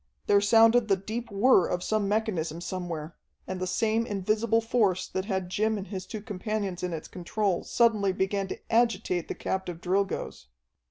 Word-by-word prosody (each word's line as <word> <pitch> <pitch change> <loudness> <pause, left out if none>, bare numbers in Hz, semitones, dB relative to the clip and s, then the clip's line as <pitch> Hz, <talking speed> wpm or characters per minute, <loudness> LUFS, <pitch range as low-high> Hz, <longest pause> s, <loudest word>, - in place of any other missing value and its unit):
There 200 0 +4
sounded 225 +2 +5
the 195 - +4
deep 220 +5 -5
whir 200 -2 +4
of 180 0 -2
some 215 -2 0
mechanism 185 -7 -1
somewhere, 175 -3 -5 0.3
and 185 0 -5
the 185 - -2
same 225 +4 +1
invisible 215 +3 +1
force 225 -5 +1
that 190 0 -3
had 190 -3 -2
Jim 215 +4 0
and 195 - -5
his 190 -2 -6
two 215 -2 -6
companions 205 -2 -3
in 180 - -2
its 160 -2 -5
control 185 +1 -1
suddenly 215 -5 +2
began 195 +1 -1
to - - -5 0.2
agitate 220 -7 +1
the - - -4
captive 185 -3 -3
Drilgoes. 190 - -2
200 Hz, 170 wpm, -28 LUFS, 185-220 Hz, 0.3 s, sounded